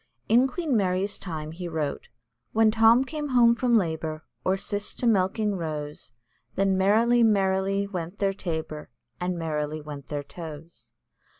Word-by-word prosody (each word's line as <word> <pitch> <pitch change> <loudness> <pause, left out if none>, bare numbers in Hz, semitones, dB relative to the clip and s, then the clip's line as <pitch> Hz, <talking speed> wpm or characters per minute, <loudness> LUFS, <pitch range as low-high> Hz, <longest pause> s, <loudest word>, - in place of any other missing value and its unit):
"In 245 +4 +5
Queen 305 -1 -2
Mary's 190 -1 0
time" 155 -4 -5
he 175 +2 -6
wrote 155 -4 -3 0.5
"When 220 0 +4
Tom 225 +3 +5
came 295 +2 -4
home 240 -2 +5
from 235 0 +3
labour, 160 -4 -2 0.2
Or 190 +1 +1
Cis 205 +1 -3
to - - -3
milking 210 0 +2
rose, 150 -6 -5 0.4
Then 195 -1 +2
merrily, 225 +6 +4
merrily 195 -2 +2
went 180 -1 -5
their 195 -1 +1
tabor, 160 -5 -5 0.3
And 180 0 -2
merrily 155 -2 -2
went 145 -2 -9
their 145 -2 -3
toes." 160 +2 -10
190 Hz, 145 wpm, -26 LUFS, 160-220 Hz, 0.5 s, In